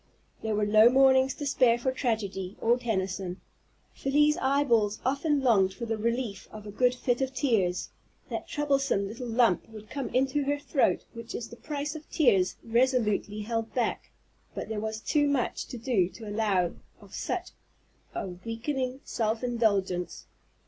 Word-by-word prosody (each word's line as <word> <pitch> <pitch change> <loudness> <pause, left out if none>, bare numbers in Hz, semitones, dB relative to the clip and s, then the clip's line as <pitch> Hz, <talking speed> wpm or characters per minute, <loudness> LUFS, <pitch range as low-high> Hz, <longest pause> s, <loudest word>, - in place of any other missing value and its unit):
There 220 -1 -1
were 210 0 +1
no 215 +2 +7
mornings 265 0 +5
to 290 - -5
spare 255 -4 +4
for 260 +2 -1
tragedy, 210 -7 -2
or 235 +2 +3
Tennyson. 190 -5 -2 0.5
Felie's 295 +2 +3
eyeballs 240 -7 +2
often 280 +2 +1
longed 195 -6 +3
for 235 - -5
the 225 -1 -1
relief 230 -2 -2
of 215 -1 -10
a 205 - -7
good 250 +4 +2
fit 245 0 0
of 265 0 -2
tears; 200 -10 +1 0.4
that - - -5
troublesome 275 -8 +1
little 235 +4 -6
lump 230 -4 +2
would 215 -1 -12
come 275 -3 -3
into 270 +2 +1
her 285 +1 +1
throat 285 -1 +1
which 230 -1 -7
is 235 - -5
the - - -10
price 295 +3 -4
of 315 -1 -10
tears 195 - +3
resolutely 230 -3 +1
held 225 +1 -3
back, 245 -2 -1 0.5
but - - -5
there 220 -1 -2
was 220 0 -4
too 290 +4 +2
much 280 -4 -1
to 245 - -7
do 225 -7 +1
to 220 +2 -11
allow 205 -4 +1 0.3
of - - -16
such - - -3 0.6
a - - -3
weakening 245 +8 -4
self 225 +1 -1
indulgence. 200 -8 0
235 Hz, 165 wpm, -28 LUFS, 210-265 Hz, 0.6 s, no